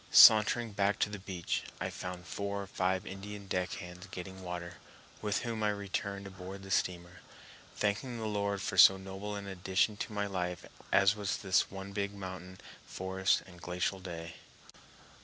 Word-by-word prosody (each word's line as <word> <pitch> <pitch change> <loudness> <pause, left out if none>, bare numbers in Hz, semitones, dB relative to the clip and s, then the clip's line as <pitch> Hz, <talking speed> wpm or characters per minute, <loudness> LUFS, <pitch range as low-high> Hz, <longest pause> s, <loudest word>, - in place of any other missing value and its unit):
Sauntering 110 +1 +8
back 100 0 +2
to 105 - +1
the 105 - -5
beach, 95 -3 -2 0.2
I - - -2
found 90 -1 -6
four 100 +3 -3
or - - -7
five 95 -1 0
Indian 100 +1 -7
deck 90 -1 -1
hands 90 +2 -8
getting 95 +1 -7
water, 90 -1 -5 0.4
with 105 -1 0
whom 115 -2 -2
I 105 - +3
returned 100 -1 -3
aboard 95 0 -8
the 95 - -8
steamer, 90 -1 -1 0.5
thanking 115 +4 -1
the 110 - -4
Lord 100 -2 -1
for 95 - 0
so 95 - +10
noble 95 +2 -5
an 100 0 -5
addition 95 +2 +1
to 115 - -4
my 105 -1 -1
life 90 -3 -3 0.3
as 100 +1 +5
was 105 -2 -1
this 95 -2 +2
one 95 +1 -7
big 100 0 -2
mountain, 95 -1 -7 0.3
forest, 95 0 +1
and 90 -2 -14
glacial 90 +2 -1
day. 85 -3 -7
95 Hz, 170 wpm, -33 LUFS, 90-100 Hz, 0.5 s, so